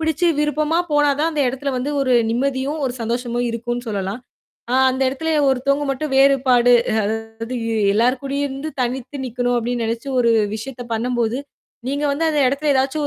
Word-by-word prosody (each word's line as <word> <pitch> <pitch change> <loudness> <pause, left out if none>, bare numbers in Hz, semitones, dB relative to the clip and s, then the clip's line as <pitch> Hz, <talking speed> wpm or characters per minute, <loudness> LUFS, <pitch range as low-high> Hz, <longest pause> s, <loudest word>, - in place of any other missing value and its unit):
பிடிச்சு 320 +2 +1
விருப்பமா 300 +2 +1
போனாதான் 295 +2 +2
அந்த 295 - +1
இடத்துல 270 +2 -3
வந்து 255 +3 -2
ஒரு 260 -2 +2 0.2
நிம்மதியும், 270 +4 -1
ஒரு 245 - -3
சந்தோஷமும் 240 +1 -2
இருக்குன்னு 240 +1 -4
சொல்லலாம். 200 +2 -3 0.5
ஆ - - +2 0.2
அந்த 260 +1 -1
இடத்துலே 320 +5 -2 0.2
ஒருத்தவுங்க 275 +3 0
மட்டும் 275 +2 -4
வேறுபாடு 260 -3 +4 0.3
அதாவது 225 +3 -4 0.4
எல்லாருக்கூடயே 270 +5 +1
இருந்து 275 +3 -5
தனித்து 255 +3 -4
நிக்கணும் 245 0 -1
அப்பிடின்னு 235 0 -2
நினைச்சு 230 +4 -4
ஒரு 235 -1 +3 0.2
விஷயத்தப் 240 0 -7
பண்ணும்போது, 240 0 -1 0.5
நீங்க 285 +2 -1
வந்து 320 +3 0
அந்த 300 -2 +1
இடத்துல 285 +2 +1
எதாச்சும் 270 +3 0
260 Hz, 150 wpm, -20 LUFS, 240-285 Hz, 0.5 s, வேறுபாடு